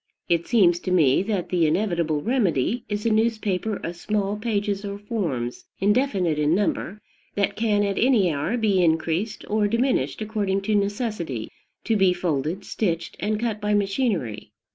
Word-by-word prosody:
It 170 Hz, -1 st, +1 dB
seems 180 Hz, -8 st, +4 dB
to 185 Hz, -, -5 dB
me 155 Hz, -7 st, +4 dB
that 195 Hz, -3 st, -2 dB
the 170 Hz, -3 st, +2 dB
inevitable 170 Hz, -4 st, 0 dB
remedy 230 Hz, -, 0 dB
is 205 Hz, +1 st, -3 dB
a 230 Hz, -, +3 dB
newspaper 215 Hz, -2 st, 0 dB
of 170 Hz, -, -4 dB
small 205 Hz, +2 st, -1 dB
pages 205 Hz, -2 st, -1 dB
or 200 Hz, 0 st, -4 dB
forms, 170 Hz, -, -3 dB
indefinite 195 Hz, -, +1 dB
in 150 Hz, +2 st, +3 dB
number, 200 Hz, 0 st, -1 dB, 0.4 s
that 200 Hz, 0 st, 0 dB
can 210 Hz, -2 st, +1 dB
at 200 Hz, -1 st, -1 dB
any 220 Hz, -9 st, +3 dB
hour 150 Hz, +12 st, -1 dB
be 205 Hz, -5 st, +2 dB
increased 165 Hz, +6 st, 0 dB
or 210 Hz, 0 st, +1 dB
diminished 240 Hz, +5 st, 0 dB
according 205 Hz, -3 st, -1 dB
to 215 Hz, +2 st, -1 dB
necessity, 200 Hz, -, -2 dB, 0.3 s
to 225 Hz, -, +1 dB
be 190 Hz, -3 st, +4 dB
folded, 175 Hz, +1 st, -2 dB
stitched, 170 Hz, -6 st, -2 dB
and 210 Hz, +1 st, -1 dB
cut 220 Hz, -2 st, -2 dB
by 210 Hz, 0 st, +1 dB
machinery. 195 Hz, -, -1 dB
200 Hz, 160 wpm, -24 LUFS, 170-215 Hz, 0.4 s, seems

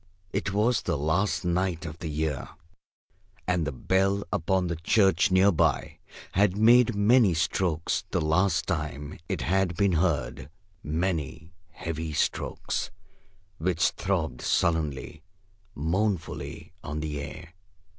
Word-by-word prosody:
It 100 Hz, 0 st, -1 dB
was 110 Hz, +4 st, +2 dB
the 85 Hz, -4 st, -1 dB
last 85 Hz, +7 st, 0 dB
night 90 Hz, -1 st, 0 dB
of 80 Hz, +1 st, -7 dB
the 80 Hz, -, -5 dB
year, 75 Hz, -3 st, -2 dB, 1.0 s
and 90 Hz, -3 st, +1 dB
the -, -, -1 dB
bell 95 Hz, +8 st, +1 dB
upon 95 Hz, +2 st, +1 dB
the 85 Hz, -1 st, -2 dB
church 95 Hz, +2 st, +3 dB
near 95 Hz, +2 st, +5 dB
by 80 Hz, -, 0 dB, 0.3 s
had 100 Hz, 0 st, +2 dB
made 120 Hz, +1 st, +5 dB
many 105 Hz, -2 st, +4 dB
strokes 85 Hz, 0 st, 0 dB
the -, -, 0 dB
last 85 Hz, +3 st, +2 dB
time 75 Hz, -3 st, -4 dB
it -, -, -2 dB
had 95 Hz, 0 st, +1 dB
been 100 Hz, -1 st, +3 dB
heard; 80 Hz, -6 st, 0 dB, 0.3 s
many 80 Hz, 0 st, -3 dB, 0.2 s
heavy 80 Hz, -1 st, -5 dB
strokes -, -, -1 dB, 0.7 s
which 90 Hz, +1 st, +2 dB
throbbed 80 Hz, -10 st, -2 dB
sullenly, 80 Hz, -2 st, 0 dB, 0.5 s
mournfully 85 Hz, +1 st, -2 dB
on 75 Hz, 0 st, -4 dB
the 75 Hz, -2 st, -3 dB
air. 75 Hz, +4 st, -9 dB
85 Hz, 125 wpm, -27 LUFS, 80-95 Hz, 1.0 s, near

